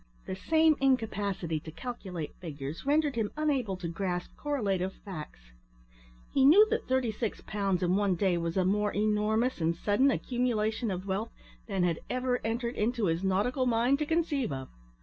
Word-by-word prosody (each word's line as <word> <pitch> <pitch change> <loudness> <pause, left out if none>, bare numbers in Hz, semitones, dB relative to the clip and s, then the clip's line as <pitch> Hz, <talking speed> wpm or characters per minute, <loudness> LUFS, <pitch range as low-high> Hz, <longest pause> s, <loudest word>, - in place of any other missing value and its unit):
The - - -4
same 315 +8 +3
incapacity 205 -10 0
to 155 - -10
calculate 180 -3 -6
figures 150 - -6
rendered 295 -1 +2
him 220 -3 0
unable 270 -11 0
to 180 -2 -5
grasp 180 +1 -3
correlative 200 -10 -1
facts. 150 - -9 0.8
He 270 - +4
knew 345 +11 +8
that 460 - -1
thirty 260 -3 +1
six 215 0 -3
pounds 195 -4 -1
in 180 +1 +2
one 200 -2 +2
day 185 0 +2
was 170 +1 -2
a 185 - +3
more 210 +2 +1
enormous 215 +2 +1
and 165 +1 +1
sudden 210 +10 +2
accumulation 240 -3 0
of 185 0 -3
wealth 200 +4 -2 0.4
than 195 -4 0
had 170 -2 +1
ever 250 0 0
entered 235 +2 -2
into 230 0 +1
his 165 +1 0
nautical 230 +8 +1
mind 245 +4 +2
to 300 - -1
conceive 310 - 0
of. 130 -1 -5
210 Hz, 170 wpm, -30 LUFS, 185-255 Hz, 0.8 s, knew